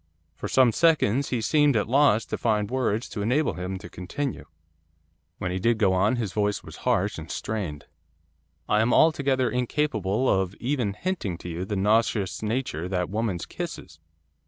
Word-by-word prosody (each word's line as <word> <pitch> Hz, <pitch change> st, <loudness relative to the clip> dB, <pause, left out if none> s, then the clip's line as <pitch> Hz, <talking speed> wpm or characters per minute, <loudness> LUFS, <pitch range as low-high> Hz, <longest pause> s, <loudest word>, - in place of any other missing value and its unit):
For -, -, -6 dB
some 130 Hz, -3 st, +4 dB
seconds 140 Hz, -4 st, +2 dB
he 120 Hz, -3 st, -1 dB
seemed 145 Hz, +3 st, +3 dB
at 105 Hz, -, +1 dB
a -, -, -14 dB
loss 135 Hz, -5 st, +4 dB
to -, -, -4 dB
find 105 Hz, -2 st, 0 dB
words 120 Hz, -4 st, 0 dB
to 105 Hz, -, -5 dB
enable 130 Hz, +9 st, +1 dB
him 90 Hz, +1 st, -4 dB
to 100 Hz, -, -10 dB
continue. 130 Hz, +10 st, -5 dB, 0.9 s
When 90 Hz, -, -3 dB
he 95 Hz, -, -2 dB
did 115 Hz, +4 st, +2 dB
go 100 Hz, -4 st, +3 dB
on, 100 Hz, +6 st, +2 dB
his 110 Hz, -6 st, -3 dB
voice 105 Hz, -1 st, 0 dB
was -, -, -11 dB
harsh 100 Hz, +1 st, +1 dB
and 80 Hz, +1 st, -9 dB
strained. 90 Hz, -10 st, -4 dB, 0.8 s
'I 105 Hz, -, +3 dB
am 115 Hz, +2 st, +2 dB
altogether 140 Hz, -5 st, +3 dB
incapable 125 Hz, -4 st, 0 dB
of 95 Hz, -2 st, +1 dB
even 120 Hz, -5 st, -1 dB
hinting 165 Hz, -, -3 dB
to 90 Hz, -, -8 dB
you 85 Hz, +2 st, -4 dB
the 105 Hz, -, -3 dB
nauseous 105 Hz, 0 st, +1 dB
nature 110 Hz, -, -2 dB
of -, -, -5 dB
that 90 Hz, -1 st, -1 dB
woman's 105 Hz, -5 st, -2 dB
kisses. 80 Hz, -, -7 dB
110 Hz, 180 wpm, -26 LUFS, 95-130 Hz, 0.9 s, some